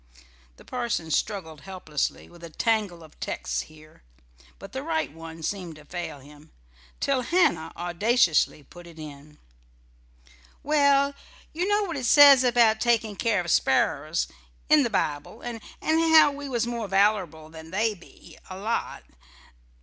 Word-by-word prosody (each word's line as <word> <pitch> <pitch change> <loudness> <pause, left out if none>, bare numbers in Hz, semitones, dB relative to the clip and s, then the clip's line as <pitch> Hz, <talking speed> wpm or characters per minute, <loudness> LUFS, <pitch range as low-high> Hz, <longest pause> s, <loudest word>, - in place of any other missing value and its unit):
The - - -17
parson 235 -10 -3
struggled 160 -6 -2
helplessly 170 -4 -4
with 170 0 -17
a 170 - -8
tangle 205 -2 -1
of 155 - -18
texts - - -3
here; 155 0 -16 0.6
but - - -11
the - - -5
right 160 -3 -2
one 165 0 -10
seemed 180 -2 -4
to 150 -1 -15
fail 165 -2 -6
him, 145 +2 -17 0.5
till 275 -2 +1
Hannah 235 - +1
audaciously 175 - +1
put 175 +5 -14
it 165 -1 -14
in: 150 -1 -11 1.3
"Well, 280 -1 +3 0.4
you 350 +4 -1
know 415 +1 +2
what 340 -6 -4
it 255 -3 -2
says 285 -2 +8
about 235 -3 +3
takin' 225 -3 +1
care 215 -3 0
of 175 -2 -3
sparrers, 145 +4 +1 0.4
in 305 -1 +6
the 245 - 0
Bible, 150 +4 -3
and 235 -2 -6 0.2
how 320 -1 +5
we 285 0 -7
was 240 -2 0
more 235 -2 -4
valerable 195 -6 +1
than 160 0 -12
they 215 +5 0
be, 180 -4 -17
a 185 - -7
lot. 220 +4 -3
195 Hz, 150 wpm, -25 LUFS, 160-245 Hz, 1.3 s, says